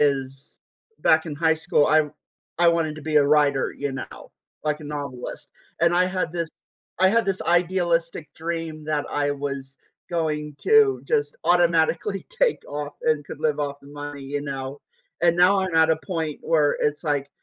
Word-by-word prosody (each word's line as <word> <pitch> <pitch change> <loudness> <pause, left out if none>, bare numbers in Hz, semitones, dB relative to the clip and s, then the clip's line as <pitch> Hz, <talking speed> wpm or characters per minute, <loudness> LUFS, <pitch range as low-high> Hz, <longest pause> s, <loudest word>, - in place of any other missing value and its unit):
is 135 -2 -1 0.4
back 160 +1 +4
in 150 - -4
high 160 +1 +3
school, 160 -1 +2
I 155 -1 +4 0.5
I 175 0 +5
wanted 165 -2 +1
to 155 - -9
be 155 -1 -1
a 145 - +6
writer, 145 -2 +3
you 140 -1 -3
know, 130 - -8 0.3
like 150 0 -1
a - - -9
novelist, 140 -4 -6 0.3
and 170 0 +4
I 180 +1 +4
had 185 -3 -2
this 170 -2 -2 0.5
I 190 - +6
had 230 +3 +3
this 195 -1 -1
idealistic 170 -3 +1
dream 165 -1 -4
that 150 -1 -1
I 145 0 0
was 140 -1 -5 0.3
going 150 -3 -2
to 435 -2 +4
just 460 +1 0
automatically 175 +2 +2
take - - +2
off 145 0 -5
and 155 -2 +1
could 140 - -9
live 150 -1 +1
off 140 -1 -3
the 140 - -15
money, 145 -1 -7
you 145 +1 -3
know, 135 0 -5 0.4
and 170 0 +4
now 190 +2 +5
I'm 185 -3 -2
at 160 0 +5
a 160 - +3
point 160 -6 -3
where 150 -3 +2
it's, 150 0 0
like, 145 -2 0
155 Hz, 180 wpm, -24 LUFS, 145-170 Hz, 0.5 s, a